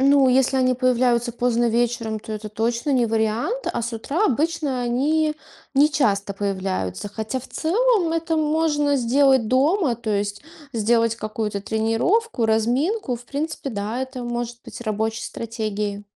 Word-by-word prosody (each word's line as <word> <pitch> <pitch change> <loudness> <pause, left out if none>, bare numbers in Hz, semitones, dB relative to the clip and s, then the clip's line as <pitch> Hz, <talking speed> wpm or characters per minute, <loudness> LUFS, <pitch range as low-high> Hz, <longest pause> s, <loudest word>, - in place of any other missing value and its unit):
Ну, 275 0 +5
если 265 +1 +3
они 255 -1 +3
появляются 245 -1 +2
поздно 240 0 +1
вечером, 230 -1 0
то 220 - -11
это 215 0 -5
точно 230 +5 -1
не 250 -3 +3
вариант. 225 - -1
А - - -2
с 235 +1 -3
утра 280 - -1
обычно 290 -1 0
они 300 +6 +1 0.4
нечасто 270 -9 +2
появляются, 190 - -2
хотя 220 +5 -4
в 260 - -13
целом 390 0 +1
это 330 0 0
можно 300 -2 +2
сделать 265 -1 +3
дома, 280 - +2
то 230 -2 -4
есть 205 0 -1 0.3
сделать 230 0 +2
какую-то 215 -2 -3
тренировку, 225 - +1
разминку. 250 - +1
В 240 - -14
принципе, 285 +1 -4
да, 215 +3 -3
это 260 -1 -6
может 240 0 -4
быть - - -9
рабочей 220 0 -2
стратегией. 210 -3 -4
240 Hz, 145 wpm, -22 LUFS, 220-285 Hz, 0.4 s, Ну